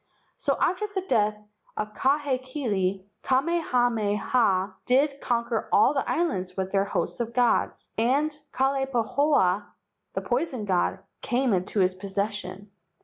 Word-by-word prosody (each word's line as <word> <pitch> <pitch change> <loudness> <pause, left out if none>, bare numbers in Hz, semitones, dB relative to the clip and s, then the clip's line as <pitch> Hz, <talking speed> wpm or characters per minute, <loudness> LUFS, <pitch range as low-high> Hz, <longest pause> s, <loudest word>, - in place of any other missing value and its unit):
So, - - -1
after 375 +4 +1
the 400 -2 -3
death 215 -3 +2 0.4
of 215 0 -3
Ka 270 +5 +2
hekili, 255 -9 -2 0.2
Kamehameha 245 - +1
did 275 +2 +2
con¬ 235 -2 0
quer 230 -2 -2
all 235 +7 +5
the 275 - -1
islands 190 - -1
with 190 0 -2
their 195 0 +2
hosts 200 - -2
of 235 0 -3
gods, 245 -2 +1
and 285 +6 +2 0.2
Kalai 270 +1 +1
pahoa, 280 +5 +2 0.5
the - - -1
poison 250 -3 -1
god, 190 0 0 0.2
came 245 -1 +1
into 190 +2 0
his 185 0 +3
possession. 200 +1 -4
240 Hz, 135 wpm, -26 LUFS, 200-275 Hz, 0.5 s, all